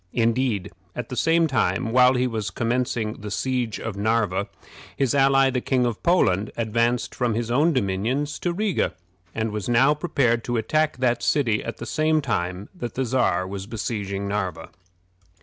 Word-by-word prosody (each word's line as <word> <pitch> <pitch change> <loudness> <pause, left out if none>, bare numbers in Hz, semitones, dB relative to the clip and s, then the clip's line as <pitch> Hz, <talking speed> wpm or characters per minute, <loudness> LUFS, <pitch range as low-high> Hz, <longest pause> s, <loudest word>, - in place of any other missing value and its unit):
Indeed, 115 -3 0 0.2
at 125 -2 -5
the 125 - -5
same 165 +4 +3
time 130 -4 0
while 125 +1 +5
he 125 0 +2
was 110 -4 -2
commencing 120 -2 -2
the 105 - -6
siege 125 +1 -2
of 110 -3 -5
Narva, 100 -2 0 0.5
his 135 -4 +1
ally, 135 -1 +4
the 125 -1 -1
King 125 -1 +1
of 120 -3 -2
Poland, 110 - +2
advanced 115 +2 0
from 120 -3 0
his 115 0 -2
own 150 +7 +3
dominions 125 +5 -1
to 175 - -1
Riga, 200 - -1 0.4
and 110 -1 -1
was 105 +1 -4
now 125 +5 +5
prepared 135 -7 0
to 120 -1 -1
attack 155 +6 +1
that 120 -2 +1
city 115 -8 +1
at 115 - -5
the - - -7
same 155 0 +1
time 95 -8 -2
that 120 - -6
the 130 - 0
Czar 100 -8 +1
was 95 0 -6
besieging 100 -3 -3
Narva. 95 -5 -3
120 Hz, 170 wpm, -24 LUFS, 105-135 Hz, 0.5 s, while